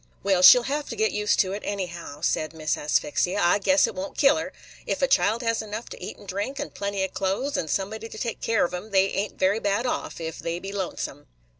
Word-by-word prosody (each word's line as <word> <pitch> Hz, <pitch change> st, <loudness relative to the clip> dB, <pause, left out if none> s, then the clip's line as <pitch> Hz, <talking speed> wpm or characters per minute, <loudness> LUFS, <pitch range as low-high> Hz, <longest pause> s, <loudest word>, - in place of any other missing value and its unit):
"Well, 190 Hz, -2 st, +2 dB
she 185 Hz, -, +11 dB
'll 245 Hz, -, 0 dB
have 290 Hz, +3 st, -3 dB
to 230 Hz, -, -4 dB
get 220 Hz, 0 st, +1 dB
used 210 Hz, 0 st, +1 dB
to 185 Hz, -, -2 dB
it, 200 Hz, +2 st, -4 dB
anyhow," 175 Hz, -7 st, -5 dB
said 155 Hz, -1 st, 0 dB
Miss 155 Hz, -1 st, -1 dB
Asphyxia. 150 Hz, +6 st, 0 dB
"I 175 Hz, +4 st, +3 dB
guess 285 Hz, +7 st, +3 dB
't -, -, -3 dB
won't 285 Hz, +1 st, -6 dB
kill 275 Hz, +1 st, +5 dB
her. 320 Hz, -, -4 dB, 0.4 s
Ef -, -, -1 dB
a -, -, +5 dB
child 235 Hz, -, +2 dB
has 230 Hz, -1 st, 0 dB
enough 215 Hz, +2 st, -6 dB
to -, -, -9 dB
eat -, -, -6 dB
and -, -, -15 dB
drink, 205 Hz, +9 st, -3 dB
and 285 Hz, 0 st, -5 dB
plenty 200 Hz, -1 st, -2 dB
of 190 Hz, -, -3 dB
clothes, 195 Hz, +9 st, -1 dB
and 155 Hz, -, -2 dB
somebody 215 Hz, +6 st, -2 dB
to -, -, -9 dB
take 230 Hz, +1 st, -4 dB
care 225 Hz, -4 st, +2 dB
of 175 Hz, -, -5 dB
'em, 180 Hz, +5 st, -5 dB
they 195 Hz, -1 st, +3 dB
ain't 200 Hz, +1 st, -3 dB
very 195 Hz, +3 st, +2 dB
bad 205 Hz, +3 st, 0 dB
off, 245 Hz, -, -3 dB
if 160 Hz, -1 st, -5 dB
they 165 Hz, 0 st, -3 dB
be 195 Hz, +2 st, -7 dB
lonesome." 180 Hz, -7 st, -4 dB
200 Hz, 250 wpm, -25 LUFS, 180-230 Hz, 0.4 s, she